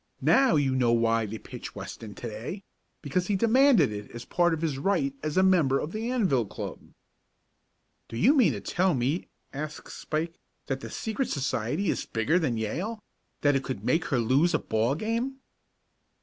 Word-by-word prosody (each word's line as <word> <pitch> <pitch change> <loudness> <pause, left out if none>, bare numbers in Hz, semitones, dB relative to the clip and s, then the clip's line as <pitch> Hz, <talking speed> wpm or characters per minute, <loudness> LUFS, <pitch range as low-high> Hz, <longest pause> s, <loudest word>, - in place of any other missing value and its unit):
Now 265 -6 +5
you 140 -3 +2
know 125 -2 +2
why 115 -1 +2
they 110 +2 -5
pitched - - -9
Weston 105 -3 -8
to 120 - -6
day 115 - -6 0.4
because 175 +5 -1
he 205 - +1
demanded 230 - +5
it 105 0 -6
as 120 0 -8
a - - -20
part 175 -1 +2
of 160 0 -2
his 145 -5 -1
right 235 - +1
as 155 +3 -3
a 185 - +5
member 170 -8 +4
of 150 - -3
the 220 +3 -3
Anvil 185 - +1
Club." - - -6 1.3
"Do 115 - -7
you 245 - +5
mean 255 -7 +4
to - - -5
tell 185 -2 +1
me," 130 +8 -1 0.3
asked 150 +2 -6
Spike, 165 +2 -3 0.3
"that 135 -2 -2
the - - -8
secret 225 +3 -2
society 135 - -1
is - - -4
bigger 140 +10 +1
than 130 -9 0
Yale 185 - -3 0.4
that 145 -1 +3
it 135 - 0
could 120 -6 -5
make 165 +2 +2
her 135 - 0
lose 135 +9 +3
a - - +5
ball 115 +5 0
game?" 230 - -2
155 Hz, 190 wpm, -27 LUFS, 120-195 Hz, 1.3 s, Now